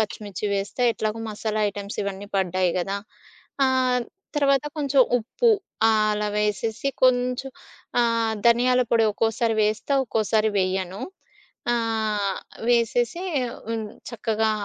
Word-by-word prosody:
పచ్చిమిర్చి 210 -2 -3
వేస్తా 200 +5 -2
ఎట్లాగో 215 0 -2
మసాలా 215 +1 -2
ఐటెమ్స్ 200 0 -7
ఇవన్నీ 200 0 -5
పడ్డాయి 185 -1 +1
గదా! 195 +3 -1 0.7
ఆహ్, 255 -1 +2 0.3
తర్వాత 275 0 +3
కొంచెం 280 -2 +2 0.2
ఉప్పు. 455 - +1 0.4
ఆహ్, 215 -1 +3
అలా 210 0 -1
వేసేసి, 210 +4 -1
కొంచెం 250 +1 +2 0.5
ఆహ్, 230 -1 +1
ధనియాల 250 +2 +4
పొడి 230 -1 +4
ఒక్కోసారి 225 +1 0
వేస్తా, 215 +6 -1
ఒక్కోసారి 220 -1 +1
వేయను. 185 0 -1 0.7
ఆహ్ 220 -4 0 0.3
వేసేసి, 240 +6 +2 0.5
హ్మ్. 225 -2 -2 0.2
చక్కగా 220 -1 0
220 Hz, 110 wpm, -24 LUFS, 210-245 Hz, 0.7 s, ధనియాల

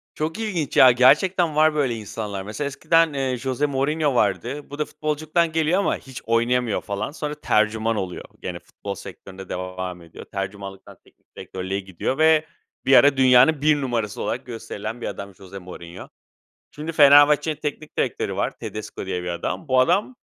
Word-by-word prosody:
Çok 160 +6 -3
ilginç 185 -10 -2
ya, 130 - +9
gerçekten 155 +7 +3
var 155 0 +4
böyle 135 -6 +1
insanlar. 105 -2 -5
Mesela, 110 +8 -4
eskiden, 160 +3 +2
eee, 130 -2 -1
Jose 130 +3 -1
Mourinho 145 +1 0
vardı. 135 +4 -1
Bu 145 +1 -9
da 150 - +1
futbolculuktan 155 +2 -1
geliyor 160 +3 +1
ama 200 - 0
hiç 130 -2 -10
oynayamıyor 115 0 +1
falan. 100 +6 -4
Sonra 150 -1 -5
tercüman 110 -4 +1
oluyor. 95 -4 -4 0.2
Gene - - -5
futbol 100 -1 -8
sektöründe 95 +1 -11
devam 90 0 -5
ediyor. 85 -1 -12
Tercümanlıktan 95 0 -7
teknik - - -29
direktörlüğe 95 +1 -4
gidiyor 95 +6 -4
ve 155 0 +4 0.4
bir 135 - +6
ara 140 +1 +6
dünyanın 130 +3 +5
1 150 -1 +3
numarası 115 -5 -2
olarak 125 - -3
gösterilen 115 -1 -6
bir - - -3
adammış 100 -1 -7
Jose 100 -1 -11
Mourinho. 90 -1 -10 0.6
Şimdi 155 +2 -6
Fenerbahçe'nin 145 +1 +6
teknik 150 0 -6
direktörü - - -1
var. - - -2
Tedesco 105 -2 -7
diye 90 -2 -3
bir - - -5
adam. 85 - -4
Bu 130 -1 +3
adam 185 - +2
130 Hz, 165 wpm, -23 LUFS, 100-150 Hz, 0.6 s, ya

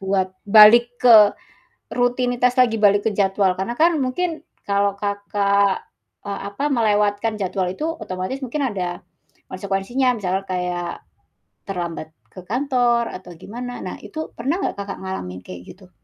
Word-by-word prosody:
buat 190 -1 -1 0.2
balik 235 +4 +7
ke 225 -4 +8 0.6
rutinitas 245 0 +1
lagi, 235 -3 +3
balik 205 0 +3
ke - - -1
jadwal, 195 -2 +2
karena 190 +5 -3
kan 335 0 +4
mungkin 315 +5 -2 0.2
kalau 200 0 +2
Kakak, 200 -1 0 0.3
eee, 200 -1 -6
apa 280 +8 -1
melewatkan 210 -3 +1
jadwal 190 0 -1
itu 305 +11 -3
otomatis 210 +6 -5
mungkin 260 +4 -4
ada 180 -3 -4 0.5
konsekuensinya, 200 +7 -1
misalnya 190 0 -2
kayak, 180 -2 -3 0.7
terlambat 170 -4 -5 0.2
ke 185 - -11
kantor 245 0 +1
atau 185 -1 -9
gimana. 245 +5 -7
Nah - - -5
itu 315 -3 -6
pernah 280 +10 -1
nggak - - -2
Kakak 200 0 -6
ngalamin 90 - -6
kayak 90 -1 -9
gitu? 185 -2 -19
205 Hz, 140 wpm, -21 LUFS, 190-245 Hz, 0.7 s, ke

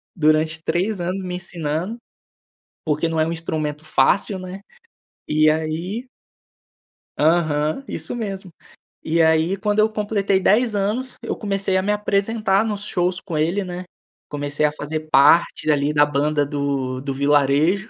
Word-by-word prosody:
durante 155 -1 +2
3 185 +4 -1
anos 185 +3 -2
me 180 -1 -4
ensinando, 175 +3 -3 0.9
porque 155 +1 0
não 160 -1 -1
é 155 - +2
um 165 - -2
instrumento 155 -2 -3
fácil, 185 +7 +2
né, 185 +1 -8 0.7
e 155 0 +4
aí 160 +9 -2 1.1
Aham, 155 - +1
isso - - -5
mesmo. 195 -6 -5 0.5
E 165 +1 +2
aí, 160 +4 +3
quando 210 +1 -1
eu 215 +1 +5
completei 205 -2 0
10 220 +4 +3
anos, 215 +6 -1
eu - - -3
comecei 195 -2 -1
a 190 - +2
me 205 +2 +1
apresentar 210 0 +1
nos 210 -2 -3
shows 180 -2 -1
com 165 -5 -4
ele, 170 +6 0
né, 180 0 -6 0.4
comecei 145 +1 -1
a 150 - -1
fazer 155 +1 -5
parte 150 +5 +4
dali, 145 0 +2
da 145 -1 +6
banda 145 +1 0
do 140 -3 -2
do 135 0 -4
Vilarejo. 145 +7 +2
170 Hz, 150 wpm, -21 LUFS, 150-195 Hz, 1.1 s, da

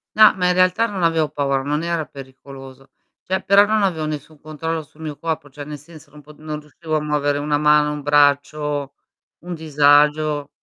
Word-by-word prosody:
No, 215 0 +7
ma 180 -1 0
in 180 - +3
realtà 185 +5 +2
non 195 -4 -4
avevo 165 -2 +1
paura, 140 -2 -1
non 150 +3 -2
era 170 -2 -2
pericoloso. 135 0 -13 0.3
Cioè 190 +1 -2
però 200 +1 +5
non 215 0 +1
avevo 160 -5 -1
nessun 150 0 -7
controllo 160 +1 -4
sul 150 +2 -25
mio 150 -2 -6
corpo, 160 -3 -4
cioè 145 +2 -9
nel 150 0 -8
senso 155 -1 -16
non 150 0 -14
pot 150 +1 -17
non 155 -1 -6
riuscivo 155 +2 -5
a 150 - -2
muovere 145 -1 -1
una 145 0 0
mano, 150 0 +3
un 150 - -6
braccio; 145 0 +1 0.5
un 175 +1 -7
disagio. 150 -1 +2
150 Hz, 190 wpm, -20 LUFS, 145-165 Hz, 0.5 s, No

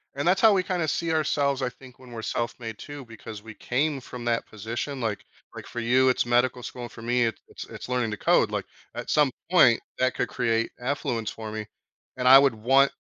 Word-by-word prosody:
And 145 +4 -2
that's 185 - +3
how 220 -2 +7
we 190 - +3
kinda 180 -4 -1
see 165 +2 -1
ourselves, 140 -3 +1
I 125 - 0
think, 125 0 -16
when 130 -2 -15
we're 115 -1 -6
self-made 115 -1 -4
too, 145 -2 -8
because 110 -2 -10
we 110 -1 -11
came 140 +3 -1
from 125 -1 -9
that 115 -1 0
position 115 +6 -5
like 110 -3 -2 0.3
like - - -8
for 120 - -6
you 130 +2 +4
it's 125 - +1
medical 120 +1 +2
school 125 0 -7
and 120 - -7
for 115 - -11
me 120 +1 +1
it's 115 - -3
it's, - - -9
it's - - -9
learning 125 -3 0
to 105 - -4
code - - +3
like - - -2 0.3
at - - -6
some 150 -3 +3 0.2
point 125 -10 +6 0.2
that 130 0 +2
could - - 0
create 115 -2 0
affluence 125 -4 -2
for 110 -1 -7
me 110 -1 -5 0.5
and 125 0 0
I 135 +1 +11
would 140 -2 +4
want 135 +5 +4
125 Hz, 225 wpm, -26 LUFS, 115-140 Hz, 0.5 s, I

